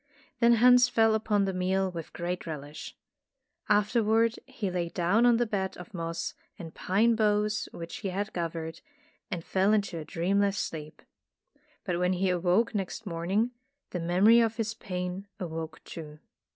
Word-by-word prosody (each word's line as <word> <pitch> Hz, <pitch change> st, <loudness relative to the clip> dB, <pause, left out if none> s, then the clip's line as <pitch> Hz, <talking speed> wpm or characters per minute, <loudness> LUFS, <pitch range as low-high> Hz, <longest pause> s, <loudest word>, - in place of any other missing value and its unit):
Then 235 Hz, 0 st, +6 dB
Hans 245 Hz, +1 st, +6 dB
fell 225 Hz, -2 st, +4 dB
upon 210 Hz, -2 st, +1 dB
the 190 Hz, -, -2 dB
meal 190 Hz, +1 st, 0 dB
with 165 Hz, -3 st, -7 dB
great 175 Hz, 0 st, -4 dB
relish. 150 Hz, -1 st, -7 dB, 0.7 s
Afterward 220 Hz, +2 st, +3 dB
he 235 Hz, -8 st, -4 dB
lay 175 Hz, -1 st, -2 dB
down 190 Hz, +8 st, +3 dB
on 240 Hz, -1 st, +5 dB
the 240 Hz, -, +2 dB
bed 190 Hz, -3 st, -2 dB
of 180 Hz, +3 st, -11 dB
moss 165 Hz, -1 st, -3 dB, 0.2 s
and 165 Hz, -2 st, -9 dB
pine 220 Hz, +5 st, +2 dB
boughs 210 Hz, -1 st, +1 dB
which 165 Hz, 0 st, -7 dB
he 200 Hz, -, -4 dB
had 200 Hz, +3 st, -3 dB
gathered, 165 Hz, -1 st, -4 dB, 0.5 s
and 170 Hz, -2 st, -4 dB
fell 195 Hz, +2 st, +2 dB
into 200 Hz, -5 st, 0 dB
a -, -, -5 dB
dreamless 195 Hz, +5 st, 0 dB
sleep. 155 Hz, -4 st, -5 dB, 0.8 s
But 175 Hz, -2 st, -1 dB
when 180 Hz, +1 st, +2 dB
he 185 Hz, +1 st, +1 dB
awoke 180 Hz, +6 st, +2 dB
next 205 Hz, +2 st, -3 dB
morn 170 Hz, -2 st, -4 dB
ing, 220 Hz, +5 st, +2 dB, 0.4 s
the 180 Hz, -, -3 dB
memory 185 Hz, +7 st, +5 dB
of 225 Hz, -1 st, +2 dB
his 225 Hz, -1 st, -2 dB
pain 180 Hz, -1 st, -5 dB
awoke 160 Hz, -2 st, -5 dB
too. 150 Hz, -2 st, -9 dB
190 Hz, 165 wpm, -29 LUFS, 170-220 Hz, 0.8 s, Then